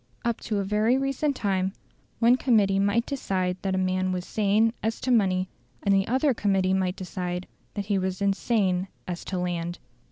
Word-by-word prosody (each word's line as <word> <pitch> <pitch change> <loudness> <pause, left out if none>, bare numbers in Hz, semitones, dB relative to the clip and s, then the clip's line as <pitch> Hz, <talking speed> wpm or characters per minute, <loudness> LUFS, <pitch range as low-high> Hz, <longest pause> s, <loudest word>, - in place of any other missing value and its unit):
Up 235 -1 0
to 215 - -2
a 200 - 0
very 210 +5 +2
recent 275 +2 0
time, 190 -3 0 0.4
one 235 +1 +5
committee 210 -7 +3
might 205 +4 +2
decide 185 -9 -1
that 190 -1 -1
a - - 0
man 185 0 0
was 180 -1 -3
sane 215 +2 +2
as 225 +1 -1
to 255 - 0
money, 190 -5 +3 0.4
and 200 - +3
the 195 0 +2
other 265 +3 +2
committee 195 -4 +1
might 190 -1 0
decide 180 -1 -4 0.3
that 205 -1 -3
he 200 -1 +1
was 185 0 -2
insane 195 -2 +1 0.2
as 175 -1 -4
to 190 - -3
land. 175 -1 -2
195 Hz, 185 wpm, -26 LUFS, 185-225 Hz, 0.4 s, one